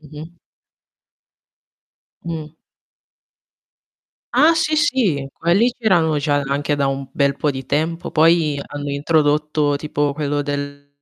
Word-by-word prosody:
Mh-mh. 155 +2 -11 1.9
Mh. 160 -2 -6 1.8
Ah 320 +2 +5
sì, 310 -1 +1
sì, 225 - +1
quelli 200 +9 +2
c'erano 175 -9 +2
già 145 0 0
anche 145 +1 -1
da 140 - +1
un 135 0 -3
bel 140 -1 +1
po' 150 +1 0
di 135 -1 -7
tempo, 160 +5 -2
poi 160 -2 +3
hanno 145 0 -6
introdotto, 150 0 +1
tipo 145 -1 -1
quello 145 0 -2
del 145 0 -5
150 Hz, 115 wpm, -20 LUFS, 145-165 Hz, 1.9 s, Ah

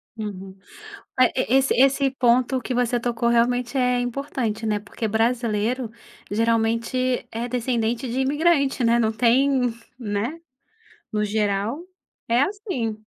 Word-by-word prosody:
Uhum. 195 -3 -7 0.6
Ma 255 - +7
e 255 - 0
esse 265 +2 +3
esse 270 +1 +3
ponto 255 0 +2
que 250 - -4
você 245 0 +1
tocou 235 0 -1
realmente 245 +2 +1
é 250 -1 +2
importante, 245 -3 -3
né, 210 -1 +1
porque 220 +2 -5
brasileiro 230 +1 0 0.4
geralmente 230 +3 0
é 235 +2 -3
descendente 240 0 -1
de 260 +2 -1
imigrante, 280 -2 +2
né, 235 +1 +4
não 220 -2 +1
tem 250 +2 +2 0.3
né. 225 +7 -3 0.7
No 210 0 0
geral 210 - -1 0.5
é 235 +2 +4
assim. 305 - -2
240 Hz, 130 wpm, -23 LUFS, 225-260 Hz, 0.7 s, Ma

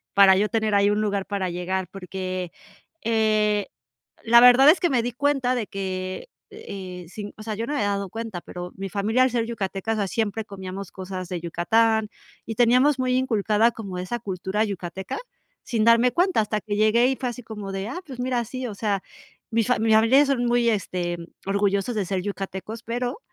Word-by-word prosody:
para 195 -1 +8
yo 210 +2 +1
tener 220 -2 0
ahí 200 0 +4
un 210 +1 +1
lugar 200 -2 -1
para 195 -3 -2
llegar, 180 +1 -2
porque, 185 -1 -5 0.5
eh, 215 -2 +2 0.6
la 235 +1 +7
verdad 250 +3 +8
es 320 - +7
que 350 - +2
me 250 -4 +2
di 245 +1 -3
cuenta 275 -1 +1
de 235 -4 -2
que, 185 - -5 0.2
eh, 185 -3 -8
sin 205 +3 -7
o - - -8
sea, 215 0 -4
yo 225 +2 -3
no 290 - -3
me - - -1
había 205 -1 +1
dado 200 -2 -2
cuenta, 225 -5 -5
pero 180 0 -8
mi 195 0 -5
familia 215 +6 +1
al 255 - +3
ser 235 -1 0
yucateca, 210 -2 -3
o - - -1
sea, 205 -2 0
siempre 220 +1 -1
comíamos 195 -1 -7
cosas 185 -1 -6
de 180 -2 -4
Yucatán 220 +6 +2 0.4
y 225 - -6
teníamos 250 +4 +4
muy 255 0 +1
inculcada 225 -3 +2
como 200 -5 -7
esa 185 +7 -3
cultura 195 0 -2
yucateca, 190 - -5 0.4
sin 225 -3 0
darme 230 +2 +5
cuenta, 360 - +2
hasta 215 0 -1
que 205 0 -3
llegué 215 +3 +4
y 265 - 0
fue 255 - -3
así 245 +1 -8
como 210 -3 -7
de, 195 +2 -4
ah, 275 +9 -5
pues 265 -4 -9
mira, 250 -1 0
sí, 255 +3 -5
o 215 - -6
sea, 200 -2 -1 0.5
mi 230 0 +2
fami 225 -2 +1
mis 220 - +5
familiares 255 +6 +5
son 260 -3 +1
muy 240 0 +2
este 180 -5 -1 0.3
orgullosos 200 +3 +1
de 210 -3 0
ser 185 0 -2
yucatecos, 200 +2 -5
pero, 245 - -3
215 Hz, 205 wpm, -24 LUFS, 195-235 Hz, 0.6 s, para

